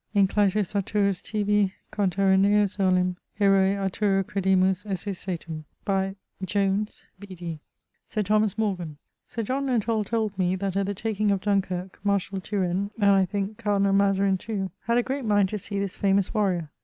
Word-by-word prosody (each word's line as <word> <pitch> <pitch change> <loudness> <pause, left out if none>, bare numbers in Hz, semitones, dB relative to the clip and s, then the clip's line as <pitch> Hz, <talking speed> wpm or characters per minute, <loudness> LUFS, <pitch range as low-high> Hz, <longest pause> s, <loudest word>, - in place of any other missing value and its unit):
Inclytus 200 0 +2
Arthurus 200 -1 0
tibi 205 -2 +1 0.2
conterranneus 195 +1 +2
olim, 185 -1 +2 0.2
Herôe 195 -1 +4
Arthuro 195 0 +1
credimus 190 -1 +1
esse 200 -1 -3
satum.... 170 -4 -5 0.8
Jones, 200 +2 -1
B.D.] 175 -5 -7 0.5
Sir 215 - -1
Thomas 210 +1 +1
Morgan: 180 -8 -2 0.3
Sir 230 - -4
John 270 +5 -1
Lenthall 230 -3 +1
told 220 -1 -1
me 180 0 +2
that 195 0 -3
at 195 0 0
the 205 - -2
taking 215 0 -1
of 200 -2 +1
Dunkyrke, 190 -2 -1
Marshall 195 -1 0
Turenne, 190 0 -1
and, 200 -1 +5
I 195 -1 +4
thinke, 200 +2 -3
Cardinall 200 -2 +2
Mezarine 195 -1 +3
too, 195 -3 -4
had 235 +1 +2
a 245 - +3
great 270 +2 -3
mind 205 -3 +3
to 210 - -3
see 200 +1 -5
this 200 -1 -2
famous 195 -1 +1
warrior. 185 -8 0
200 Hz, 155 wpm, -26 LUFS, 190-210 Hz, 0.8 s, and